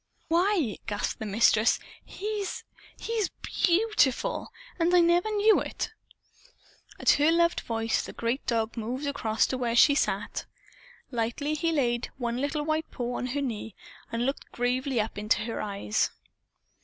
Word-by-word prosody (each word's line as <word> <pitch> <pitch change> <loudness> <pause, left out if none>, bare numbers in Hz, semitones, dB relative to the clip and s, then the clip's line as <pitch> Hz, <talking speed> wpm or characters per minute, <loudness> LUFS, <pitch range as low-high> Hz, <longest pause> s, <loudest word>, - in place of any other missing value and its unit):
"Why!" 335 - +2
gasped 205 0 -2
the 220 - -4
Mistress. 215 +2 +4 0.3
"He's 415 -1 -4 0.3
he's 450 -4 -1
BEAUTIFUL! 415 - +1 0.3
And 345 +2 +3
I - - +7
never 345 +4 +3
knew 425 0 +4
it." - - -4 1.1
At - - +5
her 295 +3 +4
loved 335 0 +3
voice 225 -1 -1
the - - -7
great 235 +4 -2
dog 225 -1 0
moved 245 +5 -3
across 225 -6 +1
to 260 - -3
where 235 -2 0
she 285 +4 +7
sat. 280 - -1 0.7
Lightly 240 +5 -1
he 330 +2 0
laid 240 -6 0
one 240 -2 -2
little 290 +3 -1
white 315 +1 -1
paw 245 0 -4
on 250 - -2
her 280 +3 -2
knee 225 -5 -4 0.4
and 230 +1 -1
looked 275 +2 -3
gravely 250 +1 0
up 215 -1 -2
into 210 +1 +1
her 225 0 -3
eyes. 200 - 0
260 Hz, 150 wpm, -28 LUFS, 230-335 Hz, 1.1 s, I